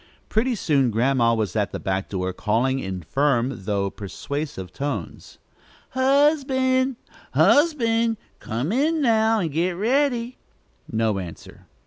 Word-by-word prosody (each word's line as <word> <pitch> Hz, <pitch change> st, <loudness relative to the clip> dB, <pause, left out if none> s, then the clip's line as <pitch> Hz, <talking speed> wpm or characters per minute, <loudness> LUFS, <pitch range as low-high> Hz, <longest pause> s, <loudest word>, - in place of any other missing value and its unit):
Pretty 240 Hz, +3 st, +1 dB
soon 140 Hz, -, +2 dB
Grandma 115 Hz, +1 st, +2 dB
was 110 Hz, -4 st, -2 dB
at 105 Hz, -2 st, 0 dB
the -, -, -5 dB
back 95 Hz, 0 st, -2 dB
door 95 Hz, -1 st, -2 dB
calling 120 Hz, +7 st, 0 dB
in 95 Hz, -6 st, -5 dB
firm 130 Hz, -, 0 dB
though 100 Hz, -1 st, -1 dB
persuasive 105 Hz, -, -6 dB
tones: 135 Hz, -, -5 dB, 0.5 s
"Husband! 265 Hz, -1 st, +2 dB, 0.4 s
husband! 230 Hz, -7 st, +3 dB, 0.2 s
come 120 Hz, -, -3 dB
in, 305 Hz, +7 st, +1 dB
now, 225 Hz, -2 st, +3 dB
and 165 Hz, -4 st, -2 dB
get 170 Hz, +5 st, 0 dB
ready." 245 Hz, +4 st, 0 dB, 0.5 s
No 110 Hz, -3 st, 0 dB
answer. 85 Hz, -3 st, -10 dB
145 Hz, 120 wpm, -23 LUFS, -, 0.5 s, husband